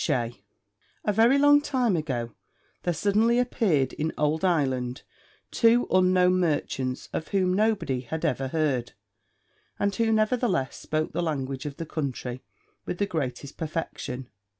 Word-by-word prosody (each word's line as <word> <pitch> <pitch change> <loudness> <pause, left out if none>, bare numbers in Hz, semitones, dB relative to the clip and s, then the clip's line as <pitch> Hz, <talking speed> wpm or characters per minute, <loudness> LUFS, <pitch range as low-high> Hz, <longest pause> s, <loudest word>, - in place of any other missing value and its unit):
A 210 - +2
very 230 +6 +5
long 290 +1 +6
time 255 -8 +1
ago, 125 -8 -3 0.5
there 175 - 0
suddenly 215 +7 +2
appeared 190 - +1
in 160 +1 -2
old 150 +3 +1
Ireland 130 -8 0 0.5
two 235 +1 +4
unknown 185 0 +4
merchants 135 -6 -1
of 160 - -3
whom 185 -2 +1
nobody 205 - +1
had 160 +6 -4
ever 135 -4 0
heard, 135 -5 -1 0.8
and 200 0 0
who 225 0 +1
nevertheless 215 - +1
spoke 155 0 -2
the - - -2
language 140 -4 -3
of 145 - -7
the 165 - -4
country 130 -5 -4 0.4
with - - -4
the 200 - +1
greatest 140 -6 -4
perfection. 150 -5 -4
165 Hz, 135 wpm, -26 LUFS, 135-205 Hz, 0.8 s, long